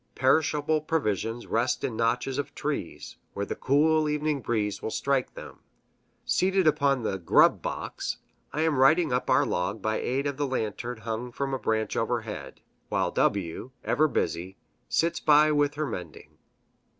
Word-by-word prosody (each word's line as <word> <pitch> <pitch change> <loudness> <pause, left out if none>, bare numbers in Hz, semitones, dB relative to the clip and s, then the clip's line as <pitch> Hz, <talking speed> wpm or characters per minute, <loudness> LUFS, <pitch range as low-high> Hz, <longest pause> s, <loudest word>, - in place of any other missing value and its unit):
Perishable 150 +3 +2
provisions 115 - -1
rest 120 +3 0
in 115 - -2
notches 125 +4 0
of 145 - -4
trees, - - -4 0.2
where 100 - -2
the - - -4
cool 155 +3 +2
evening 150 -1 -1
breeze 105 -4 -1
will - - -3
strike 135 +2 -1
them. - - -10 0.7
Seated 190 0 +2
upon 140 -4 +2
the 95 -3 -2
"grub" 85 - +4
box, - - -4 0.3
I 150 - -2
am 160 -4 +1
writing 155 +1 +4
up 125 - -1
our - - +4
log 90 +5 -2
by 110 +2 -1
aid 135 +3 -1
of 140 -2 -2
the 145 -1 0
lantern 120 -1 -3
hung 115 +2 -4
from 135 +2 -3
a 135 - -1
branch 110 -1 -1
overhead, 115 -2 -3 0.3
while - - 0
W, 95 +4 0
ever 155 +2 +2
busy, 95 - -2 0.3
sits 170 0 +1
by 150 0 +5
with 145 -1 +2
her 155 +1 -1
mending. 90 - -8
130 Hz, 160 wpm, -27 LUFS, 110-150 Hz, 0.7 s, by